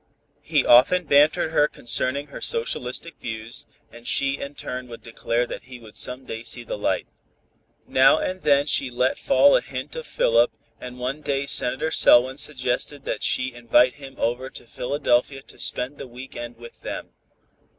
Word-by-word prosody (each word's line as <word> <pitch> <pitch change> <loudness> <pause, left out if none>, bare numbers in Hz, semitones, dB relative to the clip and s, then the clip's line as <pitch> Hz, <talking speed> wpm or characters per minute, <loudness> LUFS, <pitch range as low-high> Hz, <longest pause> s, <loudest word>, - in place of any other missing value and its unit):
He - - +1
often 135 +10 +6
bantered 150 +2 +4
her 150 -2 +4
concerning 140 +1 0
her - - -9
"socialistic 170 - -2
views," 110 0 -6 0.2
and 120 0 -12
she 135 0 +2
in 140 +1 -7
turn 125 -2 -6
would 115 -1 -11
declare 115 +1 -1
that 120 - -8
he 125 0 -10
would 110 -2 -15
some 125 +1 -1
day 115 - -6
see 120 +1 -4
the - - -5
light. 105 - -1 0.8
Now 130 +3 +5
and 185 +2 -3
then 140 -1 +3
she 140 -3 +2
let 125 +1 0
fall 280 - +5
a - - +3
hint - - -7
of 480 -1 -6
Philip, - - +3 0.3
and 125 0 -9
one 130 +4 -4
day 140 -1 -1
Senator 140 +4 0
Selwyn 130 0 +5
suggested 135 0 -2
that - - -3
she 130 0 0
invite 120 +2 +3
him 135 -2 -11
over 125 +3 -1
to - - -11
Philadelphia 135 +1 -1
to - - -17
spend 130 +3 -3
the - - -7
week 125 +2 -11
end 120 0 -7
with 120 0 -13
them. - - -6
130 Hz, 175 wpm, -23 LUFS, 120-145 Hz, 0.8 s, often